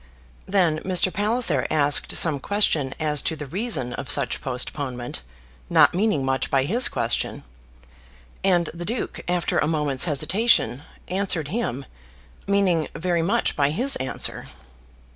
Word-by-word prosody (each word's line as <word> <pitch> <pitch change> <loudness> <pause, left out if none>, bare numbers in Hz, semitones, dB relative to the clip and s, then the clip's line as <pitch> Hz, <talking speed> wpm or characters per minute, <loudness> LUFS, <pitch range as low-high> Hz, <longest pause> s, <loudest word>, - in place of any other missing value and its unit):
Then 175 -6 +2
Mr. 185 +1 +2
Palliser 205 - +1
asked 145 -2 +2
some 155 -4 +4
question 150 -6 0
as 150 -2 +2
to 160 - -2
the 150 -1 -7
reason 180 - -2
of 140 0 -6
such 140 -3 +1
postponement, 125 - -4 0.5
not - - +5
meaning 180 -7 0
much 135 0 -1
by 135 -1 +2
his 230 - +3
question, 115 0 -2 1.0
and 175 -4 +2
the 170 +1 -7
Duke, 230 +6 -4
after 175 -1 0
a 145 - +1
moment's 150 -4 +1
hesitation, 180 - +2 0.3
answered 180 -5 -1
him, 155 - -3 0.6
meaning 190 -6 +2
very 175 0 -1
much 205 +8 0
by 140 -1 +2
his 255 - +1
answer. 130 - -3
160 Hz, 135 wpm, -23 LUFS, 140-195 Hz, 1.0 s, not